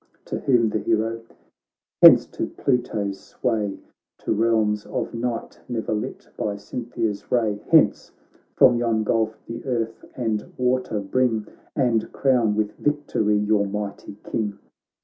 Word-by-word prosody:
To - - -4
whom 120 -4 +3
the 110 - -1
hero: 115 +1 0 0.4
' - - -68
Hence - - +9
to - - -3
Pluto's 105 -6 -1
sway, 105 -4 -2 0.4
To - - -2
realms 110 -1 +1
of - - -3
night 115 0 -4
ne'er 115 -2 -2
lit 105 - -4
by 105 -1 -2
Cynthia's 110 0 -4
ray; 110 -4 +1
Hence - - +4 0.2
— - - -34
from 125 -2 +6
yon 115 -2 +1
gulf 110 0 0
the 115 +1 -7
earth 115 -3 -2
and 110 -4 -2
water 125 -4 0
bring 110 +1 0 0.3
And 120 -5 +1
crown 125 -6 +2
with 105 -1 0
victory 145 -8 +1
your 105 -1 +2
mighty 100 0 -5
King.' 105 -2 -3
110 Hz, 140 wpm, -23 LUFS, 105-120 Hz, 0.4 s, Hence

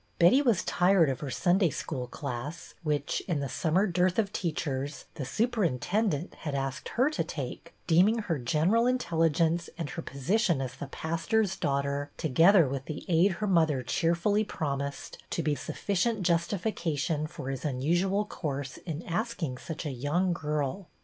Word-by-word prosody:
Betty 180 +11 +6
was 235 -10 +2
tired 175 -5 +4
of 130 - -4
her 145 - -4
Sunday 175 +7 +3
School 130 -3 -4
class, 140 +4 -6
which, 150 -3 -1
in 170 -6 0
the 140 - -2
summer 165 - +1
dearth 180 -1 +1
of 210 -3 +1
teachers, 145 -5 -3
the 135 - -5
superintendent 190 - 0
had 150 -3 -3
asked 135 -1 -3
her 265 +5 +4
to - - -1
take, - - -6
deem 175 +3 +5
ing 225 +2 +2
her 165 -7 -1
general 165 - +2
intelligence 165 - +1
and 165 -4 -4
her 165 - -4
position 170 - +1
as 130 -2 -3
the 145 - -6
pastor's 175 +8 0
daughter, 140 -1 -1
together 165 +3 +5
with 135 0 -4
the 155 - -6
aid 180 +3 +4
her 210 +5 -3
mother 160 -8 +3
cheerfully 170 - +1
promised, 140 -7 -4
to - - -2
be 150 0 +1
sufficient 200 +7 -1
justification 170 -4 0
for 135 -3 -6
his 135 - -5
unusual 175 +9 +1
course 140 -8 -4
in 165 -1 -6
asking 175 - -2
such 160 0 -6
a 145 - -2
young 150 +8 0
girl. 150 +2 -2
165 Hz, 160 wpm, -29 LUFS, 140-190 Hz, -, Betty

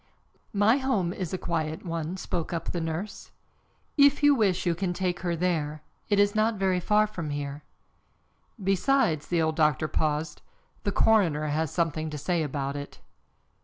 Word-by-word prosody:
"My 210 +5 +4
home 230 -11 0
is 185 -5 -4
a 185 - -1
quiet 160 -2 -3
one," 165 +1 -3
spoke 170 -3 -3
up 165 - -3
the 175 - -2
nurse. 165 +6 -5 0.7
"If 285 +1 +5
you 290 0 +7
wish 200 -9 +1
you 175 - +2
can 175 +1 -2
take 180 -1 -1
her 175 -1 -1
there. 155 -3 -1 0.3
It 205 - +3
is 205 0 +4
not 220 +1 +2
very 190 -2 +1
far 210 +4 +3
from 170 -7 -5
here." 145 0 -4 1.0
"Besides," 195 - +1
the 170 -2 +1
old 160 0 0
doctor 155 -1 +2
paused. 150 0 -1 0.4
"The 200 - +1
coroner 170 -10 +3
has 155 +1 0
something 160 -1 -1
to 150 - -5
say 170 +3 0
about 140 -2 -3
it." 145 0 -7
170 Hz, 165 wpm, -27 LUFS, 155-200 Hz, 1.0 s, you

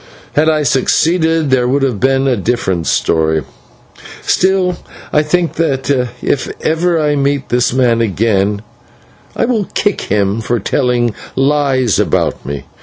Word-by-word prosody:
Had 155 +2 +3
I 155 -1 +1
succeeded, 160 +3 +1
there 125 -2 +2
would 135 +2 +1
have 125 -7 0
been 135 +2 +2
a 130 - +2
different 95 -6 -1
story. 80 -1 +1 0.8
Still 185 -1 +1 0.4
I 150 - +4
think 170 +2 0
that, 140 -4 0 0.3
if 140 - -1
ever 165 +1 +1
I 150 -1 +1
meet 140 -1 -1
this 125 0 +1
man 120 -2 +2
again, 105 -1 0 0.7
I - - +1
will 230 -4 0
kick 205 -2 0
him 100 +1 0
for 120 +1 -1
telling 120 +1 0 0.2
lies 135 -5 +1
about 100 -7 0
me. 70 -1 -5
135 Hz, 140 wpm, -14 LUFS, 115-155 Hz, 0.8 s, I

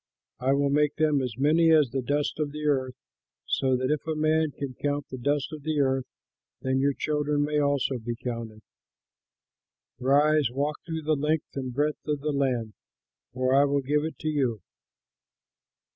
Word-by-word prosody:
I 130 +2 +2
will 140 0 +2
make 150 0 +2
them 150 -3 +2
as 125 -4 -4
many 160 +4 +4
as 150 -6 +5
the 135 - -1
dust 145 +4 -1
of 150 -2 -1
the 150 +1 -6
earth, 130 -3 +1 0.5
so 130 -1 +1
that 130 +2 -1
if 150 +1 -2
a 160 - -1
man 155 +1 +2
can 140 -2 -6
count 145 +2 -2
the 130 - -5
dust 145 +3 -1
of 155 - -7
the 155 0 -1
earth, 135 -2 +1 0.6
then 130 0 +1
your 140 0 +2
children 150 -1 0
may 150 0 0
also 140 -3 +1
be 120 +1 -4
counted. 115 -3 -6 1.4
Rise, 145 +2 +3
walk 145 +4 -2
through 160 -1 -4
the 155 +1 +2
length 150 +2 -1
and 130 -2 -3
breadth 145 +5 -1
of 150 -2 -1
the 150 +1 -1
land, 125 -6 0 0.6
for 130 +1 0
I 140 +1 +6
will 140 0 +1
give 145 +3 +1
it 160 - -4
to 155 - -3
you." 130 -8 0
140 Hz, 180 wpm, -27 LUFS, 130-150 Hz, 1.4 s, I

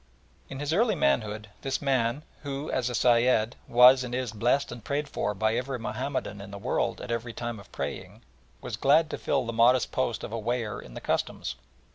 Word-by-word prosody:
In 135 - -6
his 145 +2 -1
early 215 +3 +3
manhood 105 - 0
this 135 0 -1
man, 130 -1 0 0.2
who 140 0 -4
as 125 -1 0
a 125 - -3
Sayed, 120 -1 +3
was 125 +2 +7
and 125 -1 -4
is 125 -3 -2
blessed 120 +6 +1
and 120 -2 -8
prayed 145 +4 -2
for 105 -6 -2
by 110 +3 +1
every 130 +2 -2
Mahomedan 125 -3 -3
in 100 - -9
the 100 - -7
world 100 - -1
at - - -6
every 115 0 -3
time 120 -2 -4
of 100 - -15
praying, - - -6 0.4
was - - -5
glad 155 +3 +4
to - - -4
fill - - 0
the 115 - -3
modest 120 +1 +4
post - - -1
of - - -5
a 115 - -3
weigher 115 -1 -2
in - - -13
the - - -6
Customs. - - -2
120 Hz, 205 wpm, -28 LUFS, 110-135 Hz, 0.4 s, was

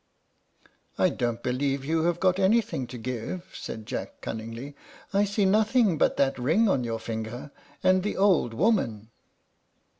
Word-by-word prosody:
"I - - +4
don't 120 -1 -2
believe 135 +2 -1
you 160 +2 +1
have 175 0 +1
got 185 0 +2
anything 200 - +2
to 125 - -8
give," 125 +9 -5
said 110 -1 -7
Jack, - - -5
cunningly; 115 +5 -6 0.4
"I 200 +1 +3
see 200 0 +1
nothing 215 - +3
but - - +2
that 135 -1 +1
ring 165 - +3
on 135 -10 +2
your 115 -1 -2
finger, 115 +4 -5 0.3
and 185 0 +4
the 210 - -3
old 185 - +3
woman." 115 - +1
145 Hz, 150 wpm, -27 LUFS, 120-195 Hz, 0.4 s, I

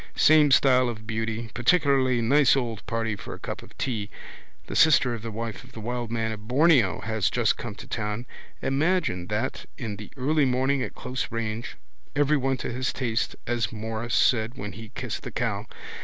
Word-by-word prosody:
Same 155 -1 +6
style 130 -2 +5
of 110 -2 -7
beauty. 110 0 -3
Particularly 130 - +3
nice 140 +4 +5
old 115 -5 -2
party 115 -1 -1
for - - -8
a - - -14
cup - - -5
of - - -16
tea. 110 -6 -2 0.6
The - - -6
sister 135 -6 +5
of 115 - -5
the 115 - -5
wife 115 +1 -5
of 130 0 -17
the 115 - -8
wild 120 +1 -3
man 115 -1 -1
of 110 0 -8
Borneo 130 - +4
has 110 -3 0
just 120 -3 +2
come 115 -4 -6
to - - -10
town. 105 +1 -3 0.4
Imagine 135 - +1
that 110 +5 -2
in 110 -5 -4
the 105 - -9
early 145 +3 +2
morning 130 +2 +1
at - - -4
close 125 0 -4
range. 115 0 -4 0.4
Everyone 140 -2 +2
to - - -4
his 130 +2 -1
taste 120 -4 -1
as 120 -1 -1
Morris 110 +1 -3
said 115 -1 +3
when 105 -4 -5
he 110 +2 -10
kissed - - -4
the - - -6
cow. - - -2
120 Hz, 185 wpm, -26 LUFS, 110-130 Hz, 0.6 s, Same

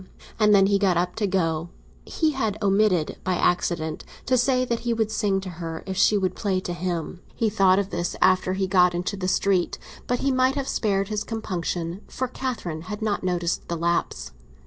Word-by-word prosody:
And 210 -1 +5
then 195 -1 +6
he 200 0 +2
got 190 -3 +2
up 180 +1 0
to 210 -2 +1
go; 165 -3 0 0.4
he 315 -2 0
had 220 -7 -1
omitted, 195 -5 +2
by 185 -1 0
accident, 170 -3 0 0.2
to 255 - +2
say 255 +1 +2
that 235 -2 -1
he 235 -1 -1
would 220 -1 0
sing 205 -3 +1
to 190 - -6
her 165 -1 -5
if 190 -1 -4
she 205 +2 +4
would 185 -2 0
play 195 -3 0
to 175 - -4
him. 175 0 -4
He 225 -2 0
thought 195 -3 +4
of 200 -1 -1
this 175 +1 -2
after 185 0 +3
he 190 0 0
got 180 -2 +4
into 180 +3 -2
the 185 -2 -3
street; 185 -1 +1 0.3
but 245 0 0
he 275 - +2
might 260 +1 +2
have 275 -2 -2
spared 195 -2 0
his 210 -1 -2
compunction, 180 -4 -3
for 260 - -3
Catherine 240 -11 -4
had 210 +1 -4
not 210 -3 -1
noticed 175 -1 -1
the 170 - -3
lapse. 165 - -1
195 Hz, 205 wpm, -24 LUFS, 175-215 Hz, 0.4 s, then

